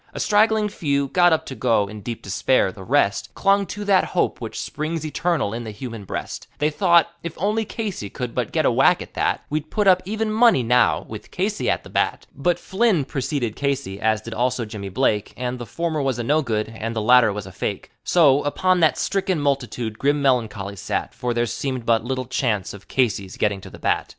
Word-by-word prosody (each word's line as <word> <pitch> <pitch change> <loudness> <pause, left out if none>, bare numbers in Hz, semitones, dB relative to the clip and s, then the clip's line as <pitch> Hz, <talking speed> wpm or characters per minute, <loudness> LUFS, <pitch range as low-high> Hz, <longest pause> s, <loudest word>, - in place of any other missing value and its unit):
A - - -4
straggling 215 0 +3
few 140 -8 -1
got 175 +2 +4
up 160 - +1
to - - -6
go, 115 -6 +1
in 105 +1 -9
deep 115 +2 -6
despair. 95 +1 +1
The 95 - -11
rest 120 -2 +1
Clung 200 0 +2
to 205 +3 -6
that 195 -2 +4
hope - - -1
which - - -5
"springs 155 +1 -3
eternal 160 -7 -1
in 120 +1 -4
the 110 - -6
human 110 -1 -7
breast;" - - -5
They 150 +1 +1
thought, 170 0 +4
If 170 -1 -6
only 210 +4 0
Casey 205 - -4
could 125 +1 -5
but - - -2
get - - +1
a - - +4
whack - - +4
at - - -16
that, - - 0
We'd 155 0 -2
put 210 -2 0
up 185 -1 +5
even 215 +3 -2
money 220 - +4
now, 125 +2 +3
with 110 -1 -9
Casey 205 +3 -1
at - - 0
the - - -12
bat. - - 0
But 175 -1 +1
Flynn 190 - +1
procede 130 -4 -2
Casey, 140 -9 -2
as 110 -1 +2
did 115 - -7
also 125 0 0
Jimmy 105 -2 -7
Blake, 105 -1 0
And 125 0 -3
the 120 - -7
former 160 +6 -2
was 135 -3 0
a 120 - -2
no 150 +6 +2
good 110 -5 -2
and 115 +1 -5
the - - 0
latter 125 -1 +6
was 100 -1 -5
a 95 - -10
fake; - - -4
So, 145 -5 +4
upon 185 +5 +1
that 160 -2 +3
stricken 190 -3 0
multitude 125 -6 -2
grim 145 +2 +2
meloncholy 110 -7 0
sat, - - -3
For 125 0 -3
there 120 0 +2
seemed 130 0 -3
but 115 -1 +2
little 130 +1 -3
chance 115 -5 -1
of 100 -1 -12
Casey's 105 -7 -1
getting 100 -2 0
to - - -10
the - - -12
bat. - - 0
130 Hz, 220 wpm, -22 LUFS, 110-170 Hz, -, latter